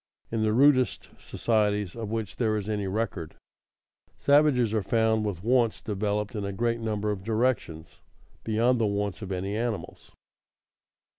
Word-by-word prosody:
_ - - -11
In 110 - 0
the 110 0 +2
rudest 130 +1 +3
societies 105 -4 0
of 115 -3 -5
which 110 -2 -4
there 110 -3 +1
is 105 -1 -4
any 105 -2 -2
record, 95 -5 -3 0.8
savages 140 -6 +3
are 110 - +1
found 110 +2 +1
with 95 -4 -4
wants 120 -1 +2
developed 105 +1 -2
in 105 - -3
a 100 - -3
great 115 +4 -1
number 105 -2 -1
of 95 -2 -5
directions 110 -8 -1 0.4
beyond 115 +3 +2
the 110 - +2
wants 100 0 -2
of 100 -2 -6
any 95 +2 -2
animals. 115 -1 -4
110 Hz, 155 wpm, -27 LUFS, 100-115 Hz, 0.8 s, rudest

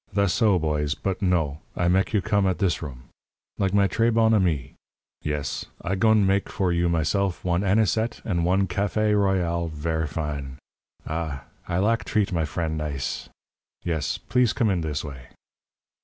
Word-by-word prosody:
"Thass 100 -4 +3
so, 105 -5 +4
boys. 75 -2 0
But 95 -2 -3
no. 80 -6 +1 0.2
I 85 - +2
mek 95 +2 +2
you 105 -3 +1
come 100 -2 +2
at 95 - +1
this 95 -6 0
room, 65 -6 -7 0.6
like 95 -1 +1
my 100 0 +4
trés 115 +5 +2
bon 110 0 +4
amis. 80 - +1 0.5
Yes. 75 -2 -3 0.2
I 95 - -1
goin' 110 +1 +4
mek 100 +1 +1
for 95 -4 0
you 85 0 +2
myself 85 +4 0
one 85 +1 +1
anisette 110 +3 +1
and 85 -5 0
one 95 +3 +3
café 105 +3 +1
royale 90 -4 +1
ver' 80 +1 -2
fine. 70 -3 -4 0.5
Ah! 80 -4 -3 0.2
I 85 - -1
lak 110 +4 +2
treat 105 -2 0
my 80 -2 +1
fren' 80 +1 -2
nize. 75 -3 -3 0.5
Yes. 80 -4 -1
Plis 125 -2 +1
come 110 -4 +2
in 90 -3 0
this 75 -2 -2
way." 65 -5 -9
90 Hz, 170 wpm, -25 LUFS, 80-100 Hz, 0.6 s, so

